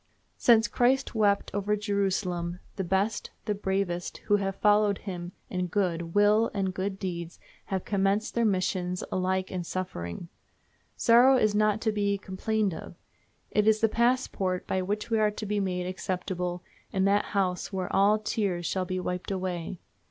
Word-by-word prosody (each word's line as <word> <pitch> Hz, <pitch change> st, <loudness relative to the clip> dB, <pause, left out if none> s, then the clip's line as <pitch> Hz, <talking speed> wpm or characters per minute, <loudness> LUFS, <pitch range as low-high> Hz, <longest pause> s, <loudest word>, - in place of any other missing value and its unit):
Since 230 Hz, -2 st, +5 dB
Christ 260 Hz, +2 st, +2 dB
wept 205 Hz, -3 st, +2 dB
over 205 Hz, +1 st, 0 dB
Jerusalem 190 Hz, -4 st, -1 dB, 0.2 s
the 195 Hz, -, -2 dB
best, 195 Hz, +4 st, 0 dB, 0.2 s
the 210 Hz, -, 0 dB
bravest, 190 Hz, -3 st, -2 dB
who 205 Hz, -, +4 dB
have 195 Hz, -1 st, -2 dB
followed 205 Hz, -1 st, +3 dB
him 175 Hz, -3 st, -6 dB, 0.2 s
in 180 Hz, -1 st, -2 dB
good 170 Hz, -3 st, -1 dB
will 210 Hz, +2 st, +4 dB
and 190 Hz, -2 st, 0 dB
good 190 Hz, +1 st, -3 dB
deeds 170 Hz, -3 st, -5 dB, 0.3 s
have 190 Hz, -2 st, -3 dB
commenced 200 Hz, +2 st, +1 dB
their 235 Hz, -, +1 dB
mission 185 Hz, -3 st, 0 dB, 0.2 s
alike 185 Hz, 0 st, 0 dB
in 180 Hz, -2 st, -3 dB
suffering. 170 Hz, -, -5 dB, 0.7 s
Sorrow 245 Hz, +3 st, +6 dB
is 215 Hz, -4 st, +2 dB
not 215 Hz, 0 st, +2 dB
to 220 Hz, -, +1 dB
be 200 Hz, -1 st, 0 dB
complained 200 Hz, +1 st, -1 dB
of; -, -, -8 dB, 0.6 s
it 210 Hz, 0 st, +2 dB
is 220 Hz, 0 st, +5 dB
the 225 Hz, -, +4 dB
passport 230 Hz, -6 st, 0 dB
by 190 Hz, -, 0 dB
which 210 Hz, +4 st, -3 dB
we 225 Hz, -, +3 dB
are 215 Hz, -1 st, +4 dB
to 210 Hz, +1 st, -6 dB
be 210 Hz, 0 st, 0 dB
made 180 Hz, -2 st, -1 dB
acceptable 180 Hz, -1 st, -3 dB, 0.3 s
in 190 Hz, 0 st, +1 dB
that 200 Hz, +1 st, +3 dB
house 185 Hz, -1 st, 0 dB
where 185 Hz, -2 st, -3 dB
all 205 Hz, +2 st, +5 dB
tears 200 Hz, -5 st, -1 dB
shall 185 Hz, +1 st, -1 dB
be 185 Hz, +1 st, -2 dB
wiped 180 Hz, 0 st, -3 dB
away. 185 Hz, -2 st, -3 dB
195 Hz, 165 wpm, -28 LUFS, 185-210 Hz, 0.7 s, Sorrow